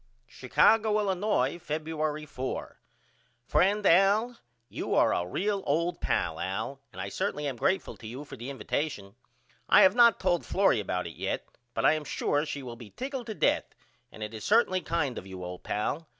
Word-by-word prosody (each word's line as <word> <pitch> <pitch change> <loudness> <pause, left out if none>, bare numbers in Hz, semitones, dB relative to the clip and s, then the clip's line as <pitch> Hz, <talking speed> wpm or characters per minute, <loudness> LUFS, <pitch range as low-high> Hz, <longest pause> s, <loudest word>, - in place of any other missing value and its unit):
Chicago, 210 - +3
Illinois, 190 -7 0
Febuery 155 -1 -3
4. 130 -2 -5 0.7
FRIEND 200 +9 +2
AL: 200 +7 +4 0.3
You - - -3
are - - +4
a 90 - -1
real 200 - -1
old 170 +5 0
pal - - 0
Al 110 +9 -3
and - - -11
I - - -3
certainly 185 -6 -2
am 140 -3 -2
greatful 190 +11 0
to 110 - -10
you 130 +6 -7
for - - -9
the 120 +3 -7
invatation. 135 -7 -3 0.6
I - - +8
have 190 - +6
not 235 -1 +6
told 175 -2 +1
Florrie 195 - +2
about 90 -3 -2
it 85 - -8
yet - - -2 0.3
but - - 0
I - - +6
am 155 -1 -2
sure 145 +1 -1
she 140 -2 -5
will 120 -2 -7
be 115 -3 -11
tickled 260 - -5
to 220 - -4
death - - +1 0.4
and 110 - -8
it 105 +1 -6
is 110 - -7
certainly 205 -4 +3
kind 145 -8 -1
of 95 - -12
you 95 -1 -8
old 90 0 -7
pal. 140 +10 -2
155 Hz, 185 wpm, -29 LUFS, 120-195 Hz, 0.7 s, I